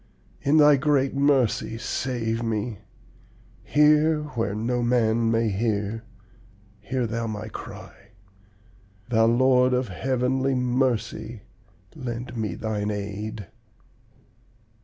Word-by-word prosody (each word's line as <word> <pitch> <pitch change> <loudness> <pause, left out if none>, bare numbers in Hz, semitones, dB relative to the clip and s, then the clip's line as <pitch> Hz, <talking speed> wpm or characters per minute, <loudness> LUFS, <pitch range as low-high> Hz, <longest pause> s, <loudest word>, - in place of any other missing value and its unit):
In 145 +3 +3
Thy 150 -2 +7
great 140 -1 +1
mercy, 135 -5 +1
save 115 -1 -2
me! 110 -2 -2 0.8
Hear 150 +1 +3
where 115 -6 -2
no 120 +3 -1
man 115 -1 +2
may 115 0 +2
hear, 105 +1 -2 0.7
hear 125 +4 -2
Thou 115 +1 -3
my 110 0 -5
cry; - - -10 1.0
Thou 115 -2 +4
Lord 125 +1 +4
of 125 -3 -1
heavenly 130 +5 0
mercy, 125 -3 -1 0.5
lend 120 0 -6
me 105 -6 -3
thine 105 -1 -2
aid!' 105 +1 -5
120 Hz, 100 wpm, -25 LUFS, 110-130 Hz, 1.0 s, Thy